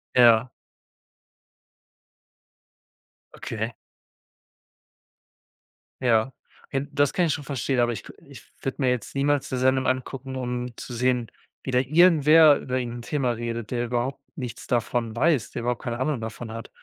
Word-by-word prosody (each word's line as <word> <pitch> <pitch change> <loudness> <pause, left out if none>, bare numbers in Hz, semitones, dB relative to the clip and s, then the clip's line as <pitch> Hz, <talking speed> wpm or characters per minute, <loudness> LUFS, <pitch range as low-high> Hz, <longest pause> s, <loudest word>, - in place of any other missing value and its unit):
Ja. 120 -1 +6 2.8
Okay. 115 +1 -4 2.3
Ja, 120 0 +2 0.4
hin 135 +1 -2
das 145 -1 +2
kann 180 - +2
ich 160 - +1
schon 145 - -5
verstehen, 135 -1 -1
aber 120 0 +2
ich 110 - -7
k - - -11 0.2
ich - - -12 0.2
würde 135 +2 -4
mir 130 - +3
jetzt 125 -1 -2
niemals 140 0 +1
'ne 130 - -1
Sendung 130 +1 +2
angucken, 130 +1 -3
um 125 -1 -4
zu 125 - -8
sehen, 125 -1 0 0.3
wie 130 - -4
da 125 - +3
irgendwer 155 +1 +6
über 130 - -4
irgend 120 -2 -3
'n - - -7
Thema 130 0 -1
redet, 115 -1 -4
der 120 0 -1
überhaupt 125 +3 -2 0.2
nichts 125 -3 -7
davon 120 -1 -1
weiß, 135 -4 +2
der 120 - -4
überhaupt 120 0 -2
keine 120 0 -3
Ahnung 140 -1 0
davon 110 +1 -6
hat. 115 0 -7
125 Hz, 150 wpm, -25 LUFS, 120-135 Hz, 2.8 s, Ja